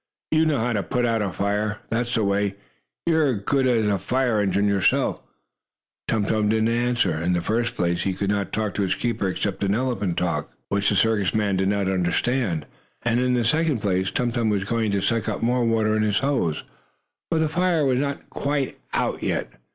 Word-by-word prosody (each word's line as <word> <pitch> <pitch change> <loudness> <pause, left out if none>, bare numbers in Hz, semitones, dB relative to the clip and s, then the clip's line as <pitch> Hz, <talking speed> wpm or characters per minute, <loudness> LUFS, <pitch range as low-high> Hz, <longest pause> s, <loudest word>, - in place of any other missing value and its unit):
"You 160 0 +3
know 150 -3 +2
how 120 +1 0
to 105 - 0
put 125 +6 -1
out 115 -2 +1
a 100 -2 -1
fire! 105 +2 -1
That's 120 +2 0
the 110 - +2
way. 100 0 0 0.5
You're 160 -6 +3
as 100 - -5
good 135 -2 +2
as 115 -4 +2
a 100 -2 +1
fire 125 0 +1
engine 100 +1 +1
yourself!" 100 -2 +1 0.9
Tum 110 -2 +1
Tum 105 0 +1
did 110 0 +2
not 115 - +2
answer. 120 -7 +1
In 90 +2 +1
the 90 - +1
first 115 +6 -1
place, 85 0 0
he 95 -1 -1
could 100 +1 -1
not 100 -2 -1
talk 110 -3 -1
to - - -2
his 95 - +1
keeper 115 -5 -1
except 95 +1 -2
in 100 +1 +2
elephant 115 -8 -1
language, 90 -1 -1 0.2
which 100 0 +1
the 105 - +1
circus 110 -1 +2
man 105 -3 +1
did 95 +1 +1
not 100 -1 +1
understand. 95 - 0 0.4
And, 120 0 +1
in 125 0 +2
the 120 -2 +1
second 155 -1 +1
place, 95 -2 +1
Tum 120 -1 -1
Tum 115 -2 0
was 100 -2 0
going 110 +2 0
to 100 -1 0
suck 115 +1 0
up - - -3
more 125 +1 +2
water 110 -1 +2
in 110 - +1
his 105 +3 +1
nose, 130 - 0 0.7
for 165 - +1
the 160 0 +2
fire 170 -1 +1
was 130 -2 +2
not 140 0 -3
quite 140 -1 -2 0.2
out - - -1
yet. - - -1
110 Hz, 215 wpm, -24 LUFS, 100-125 Hz, 0.9 s, You